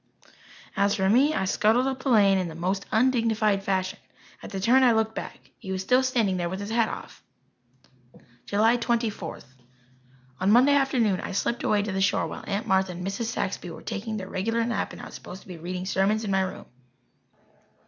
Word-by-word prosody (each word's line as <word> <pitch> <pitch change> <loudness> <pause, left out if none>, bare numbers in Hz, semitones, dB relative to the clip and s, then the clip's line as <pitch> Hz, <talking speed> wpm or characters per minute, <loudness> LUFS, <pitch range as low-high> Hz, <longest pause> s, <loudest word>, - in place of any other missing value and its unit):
As 200 +1 +2
for 190 -1 +1
me, 270 +9 +4
I - - 0
scuttled 220 +6 +2
up 265 -1 -2
the 270 - -2
lane 200 -5 +5
in 185 - -2
the 160 - -8
most 185 +4 -2
undignified 220 -4 +2
fashion. 190 -1 -2 0.4
At - - -8
the 195 - -4
turn 240 +7 +4
I 250 -3 +5
looked 220 0 +1
back. - - -8
He 190 - -7
was 190 0 -2
still 250 +6 +4
standing 230 -8 +1
there 175 -1 -2
with 190 +2 -5
his 205 +2 -5
hat 230 -1 +2
off. - - -9 1.3
July 220 +4 +3
Twenty 235 -1 0
fourth. 165 -9 -9 0.9
On 185 +2 +1
Monday 255 +5 +6
afternoon 250 -8 +2
I - - -5
slipped 235 +5 -1
away 205 -1 +1
to 205 - -3
the 190 0 -1
shore 195 - +2
while - - -7
Aunt 200 0 -2
Martha 190 -1 +1
and 180 +1 -6
Mrs. 200 +4 -3
Saxby 190 -5 -3
were 165 - -10
taking 215 +1 -4
their 190 -2 -6
regular 225 +5 -1
nap 235 - -2
and - - -10
I - - -6
was - - -11
supposed 185 - -10
to - - -21
be 180 -3 -8
reading 180 +2 -5
sermons 200 +3 +1
in 205 - -2
my 190 0 +2
room. 190 0 -4
205 Hz, 210 wpm, -26 LUFS, 190-230 Hz, 1.3 s, Monday